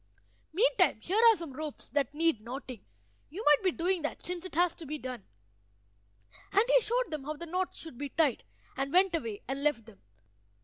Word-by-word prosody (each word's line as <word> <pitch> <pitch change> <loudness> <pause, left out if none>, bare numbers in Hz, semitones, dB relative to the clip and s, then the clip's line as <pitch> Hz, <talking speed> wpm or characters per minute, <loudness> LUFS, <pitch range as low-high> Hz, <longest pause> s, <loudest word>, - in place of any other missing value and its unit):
Meantime 470 +9 +3
here 405 +5 +1
are 450 - +6
some 330 -7 -7
ropes 305 +1 -6
that 285 -3 0
need 325 -7 +2
knotting; 250 0 -7 0.5
you 375 +9 -7
might 295 -1 +6
be 375 - +4
doing 355 +1 0
that, 300 - -3
since 355 -1 -4
it 370 - -8
has 350 0 +3
to 325 - -10
be 305 +2 -3
done." 255 -6 -7 1.3
And 410 - +5
he - - +5
showed 485 +1 0
them 300 -3 -4
how 305 +1 -3
the 340 - -7
knots 365 +2 -2
should 320 -7 -8
be 285 -1 -3
tied, 295 -4 +1 0.3
and 270 +1 -2
went 370 +1 +4
away 230 -11 -3
and 270 +2 -3
left 295 -7 +1
them. 220 -4 -16
310 Hz, 200 wpm, -30 LUFS, 270-360 Hz, 1.3 s, are